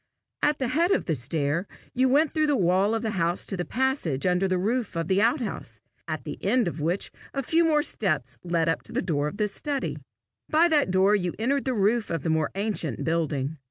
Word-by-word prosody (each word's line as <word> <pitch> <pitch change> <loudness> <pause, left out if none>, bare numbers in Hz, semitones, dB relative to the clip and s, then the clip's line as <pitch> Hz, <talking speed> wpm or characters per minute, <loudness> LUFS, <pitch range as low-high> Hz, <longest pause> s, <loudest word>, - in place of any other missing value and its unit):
At 295 0 +2
the 260 -3 -1
head 330 +7 +2
of 400 - +1
the 160 - 0
stair 145 - -1 0.3
you 260 +1 +2
went 295 +4 +3
through 310 -1 +2
the 290 - +3
wall 190 +3 +2
of 225 - -2
the 220 - -1
house 170 -2 0
to 195 - -2
the 175 - -2
passage 255 - -1
under 180 +1 +2
the 185 -1 +1
roof 220 +2 -1
of 165 -1 -1
the 190 +2 +2
out 240 +6 +2
house, 230 - -5 0.3
at - - -4
the - - -7
end 245 -5 +2
of 165 -2 -4
which 170 +5 -1 0.2
a 275 - -1
few 330 +4 +3
more 305 -2 +3
steps 155 - -1
led 170 -2 0
up 165 - +1
to - - -11
the - - -1
door 150 -5 0
of 175 - -6
the 210 -1 +1
study. 280 +6 -3 0.5
By 320 +3 +5
that 295 - +3
door 190 +2 +4
you 180 -4 0
entered 270 +5 0
the 260 -2 0
roof 215 +2 +1
of 165 - -2
the 165 - 0
more 160 -2 +1
ancient 195 - -2
building. 155 -3 -1
195 Hz, 230 wpm, -26 LUFS, 165-260 Hz, 0.5 s, By